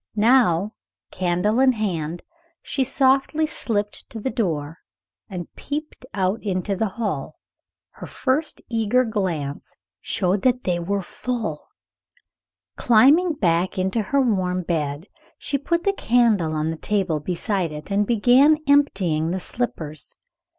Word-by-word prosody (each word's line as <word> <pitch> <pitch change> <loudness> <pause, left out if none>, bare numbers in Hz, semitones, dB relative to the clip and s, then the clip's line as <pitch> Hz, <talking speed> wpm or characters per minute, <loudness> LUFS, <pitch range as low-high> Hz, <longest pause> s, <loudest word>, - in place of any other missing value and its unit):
Now, 215 -4 +3 0.4
candle 185 +5 0
in 260 -1 +5
hand, 175 -7 -3 0.4
she 270 - -1
softly 270 +4 +2
slipped 210 -8 -3
to 225 - -7
the 260 +5 -2
door 160 -6 -2 0.5
and 180 -3 -7
peeped 295 -2 -6
out 190 +3 0
into 195 0 -2
the 220 +3 0
hall. 155 -10 -3 0.6
Her - - -10
first 285 +4 -2
eager 230 +2 +1
glance 175 -10 -3 0.2
showed 190 +1 0
that 250 -1 +1
they 175 -2 0
were 195 +3 -2
full. 220 -7 -4 1.1
Climbing 285 +10 +5
back 175 - 0
into 190 +4 0
her 280 +7 0
warm 185 -7 +1
bed, 150 -2 -2 0.3
she 280 - -2
put 340 +4 -1
the 400 - +2
candle 225 - +2
on 155 +1 -1
the 165 - -5
table 190 -5 -1
beside 180 +2 -2
it, 150 +6 -8
and 200 +1 +1
began 250 +7 +5
emptying 190 - +2
the 185 +2 -2
slippers. 160 - -3
205 Hz, 130 wpm, -23 LUFS, 175-250 Hz, 1.1 s, in